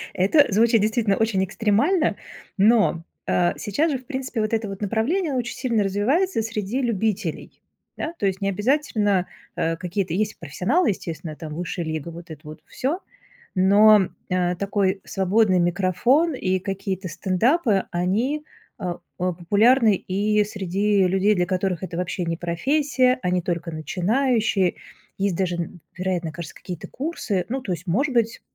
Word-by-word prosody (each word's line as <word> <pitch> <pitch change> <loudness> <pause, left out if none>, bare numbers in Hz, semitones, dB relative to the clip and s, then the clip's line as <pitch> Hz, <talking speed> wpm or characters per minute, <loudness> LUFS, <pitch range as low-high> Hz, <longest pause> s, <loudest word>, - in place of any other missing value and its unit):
Это 205 +11 +5
звучит 225 +2 +4
действительно 215 -2 +1
очень 215 -4 +1
экстремально, 225 - +1 0.4
но, 210 -5 +4 0.2
э, 175 -1 +2
сейчас 295 - 0
же, 270 - 0
в 255 - -19
принципе, 260 -4 -3
вот 215 +1 -1
это 220 -1 0
вот 195 +1 -7
направление 270 - 0
очень 245 -1 -2
сильно 235 -4 0
развивается 225 - +1
среди 225 +3 -2
любителей. 215 -7 -2 0.4
Да? 320 - -3
То - - 0
есть 190 0 -1
не 195 - +1
обязательно, 210 -4 +1 0.3
э, 165 0 -1
какие-то 180 0 -2
Есть 210 +3 -1
профессионалы, 240 - +1
естественно, 165 -5 -4
там 155 -2 -7
"Высшая 175 +2 -3
лига", 160 0 -4
вот 170 +1 -11
это 155 -1 -9
вот 155 0 -10
всё, 300 +8 -2 0.6
но, 200 +1 +6 0.2
а, 180 -1 +1
такой 195 0 0
свободный 195 0 +2
микрофон 185 - +2
и 185 -7 0
какие-то 195 0 -4
стендапы, 210 - +1
они, 220 +13 0 0.4
э, - - -8 0.3
о 180 0 0
популярны 210 +6 +4
и 210 +3 +1
среди 200 0 +1
людей, 195 +3 +2
для 180 - +1
которых 185 -1 -1
это 180 -2 -5
вообще 180 0 -2
не 165 0 -1
профессия, 255 - +1
они 180 0 +1
только 170 -1 -3
начинающие. 200 - +1 0.4
Есть 195 -2 0
даже, 180 -2 0
н 175 +1 -5 0.2
вероятно, 180 -3 -2
кажется, 165 -1 -8
какие-то 175 -3 -7
курсы. 245 - -2
Ну, 265 +1 -2
то 195 - -5
есть, 175 +1 -4
может 265 - +1
быть, 230 -2 +1
200 Hz, 155 wpm, -23 LUFS, 180-230 Hz, 0.6 s, но